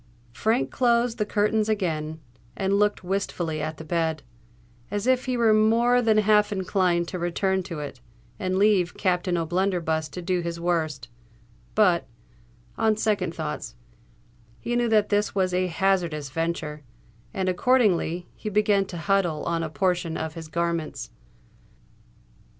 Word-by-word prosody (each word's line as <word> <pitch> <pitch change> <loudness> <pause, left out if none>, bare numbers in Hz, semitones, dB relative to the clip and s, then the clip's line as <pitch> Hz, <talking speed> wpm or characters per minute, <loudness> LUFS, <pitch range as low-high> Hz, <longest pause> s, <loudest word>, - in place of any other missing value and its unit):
Frank 220 - 0
closed 240 -1 +2
the 210 - 0
curtains 215 +1 +1
again, 160 -6 -2 0.4
and 195 +1 +1
looked 210 -1 +1
wistfully 175 -4 -2
at 155 +1 -4
the - - -8
bed, 160 -1 -1 0.7
as 205 +1 -2
if 255 0 +2
he 255 -1 -1
were 230 -2 +4
more 230 +3 +4
than 220 -2 +3
half 210 0 +4
inclined 185 -3 +1
to 185 - -4
return 190 +2 0
to 175 -4 -6
it, 140 -4 -8 0.4
and 185 0 -1
leave 195 -3 +3
Captain 180 -1 0
O'Blunderbuss 165 -2 0
to 180 - -7
do 180 +1 -1
his 170 0 -4
worst;—but, 135 - -2 0.7
on 220 -1 +2
second 195 -6 0
thoughts, 150 -7 -5 0.8
he 240 - -2
knew 240 -1 +1
that 215 -2 +3
this 205 0 +1
was 185 -2 +1
a 185 0 +1
hazardous 170 -6 0
venture—and, 150 - -5
accordingly, 185 -5 +2
he 215 - -6
began 205 -1 +2
to 180 - -8
huddle 175 -3 0
on 170 0 -1
a 160 - -3
portion 175 +1 0
of 160 -1 -4
his 165 -1 -8
garments. 170 0 -3
180 Hz, 140 wpm, -25 LUFS, 160-210 Hz, 0.8 s, were